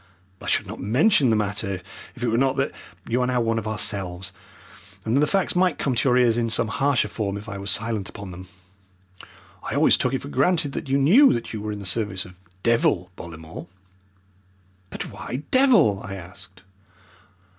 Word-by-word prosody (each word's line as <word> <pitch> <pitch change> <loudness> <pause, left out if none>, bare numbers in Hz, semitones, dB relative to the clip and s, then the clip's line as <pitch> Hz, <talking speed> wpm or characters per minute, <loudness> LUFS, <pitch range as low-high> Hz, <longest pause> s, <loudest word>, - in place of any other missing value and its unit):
I - - -8
should - - +1
not - - -8
mention 130 - +3
the 110 - +3
matter 100 -2 -2 0.4
if 125 - -8
it - - +1
were 115 - +1
not 135 +2 +2
that 135 - 0 0.4
you 120 +2 +1
are 125 - +1
now 125 -1 +1
one 115 -1 +1
of 110 - -6
ourselves, 95 -4 -2 0.7
and 110 +2 0
that - - +4
the 150 - +3
facts 195 -2 +1
might 180 -3 +2
come 135 - -1
to 120 +3 +1
your 125 - +4
ears 120 -2 +3
in 115 -1 0
some 110 0 +2
harsher 135 +2 +1
form 100 -3 -3
if 105 +2 -10
I 100 -3 -6
were 100 - -7
silent 110 -1 0
upon 100 -2 -9
them. 90 +1 -10 1.1
I - - -5
always - - +5
took - - 0
it - - -4
for - - -7
granted 160 - +1
that 135 - -6
you 135 - +3
knew 200 - +6
that 115 - -4
you 110 - -4
were 105 0 -4
in 105 - -5
the 100 - -8
service 100 0 0
of 90 0 -15 0.2
'Devil' 95 -6 +2
Bollamore." 80 -1 -9 1.2
"But - - -6
why 130 +4 -6
'Devil'?" 230 - +4
I 100 -1 -6
asked. 95 +1 -11
115 Hz, 200 wpm, -24 LUFS, 100-130 Hz, 1.2 s, knew